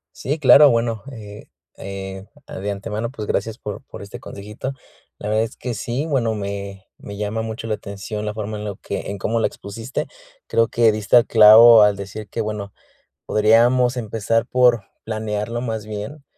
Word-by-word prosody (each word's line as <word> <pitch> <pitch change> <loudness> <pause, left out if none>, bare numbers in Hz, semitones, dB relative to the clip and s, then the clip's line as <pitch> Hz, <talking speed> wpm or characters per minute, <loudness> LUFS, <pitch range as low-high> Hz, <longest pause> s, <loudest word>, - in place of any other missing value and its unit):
Sí, 145 +7 -3
claro, 145 0 +7
bueno, 115 -2 0
eh, 105 -3 -10 0.3
eh, 95 0 -7 0.2
a - - -8
De 100 +2 -3
antemano, 110 +3 -4
pues, 110 -5 -7
gracias 110 +2 -2
por - - -7
por - - -11
este 100 - -9
consejito. 105 +6 -7 0.5
La 105 - -6
verdad 110 +1 +2
es 115 - -8
que 125 -2 -5
sí, 125 +8 -3
bueno, 120 -7 0
me 100 -1 -6
me 100 - -10
llama 105 +2 -2
mucho 110 0 -6
la 110 - 0
atención 105 +1 -6
la 105 - -3
forma 110 0 -5
en 105 - -6
lo 100 -2 -5
que 100 - -5
en 100 - -5
cómo 115 +4 -1
la 115 - +2
expusiste. 115 +5 -6 0.4
Creo 115 - +3
que 115 -1 +3
diste 105 0 -2
al 120 - +6
clavo 110 +1 +8
al 105 -1 +5
decir 100 +1 -8
que, 115 - -4
bueno, 105 -2 -4 0.5
podríamos 120 +4 +3
empezar 115 0 -1
por 125 -4 +3 0.2
planearlo, 110 +1 -3
más 110 -3 -4
bien, 110 +8 -7
110 Hz, 185 wpm, -21 LUFS, 105-115 Hz, 0.5 s, clavo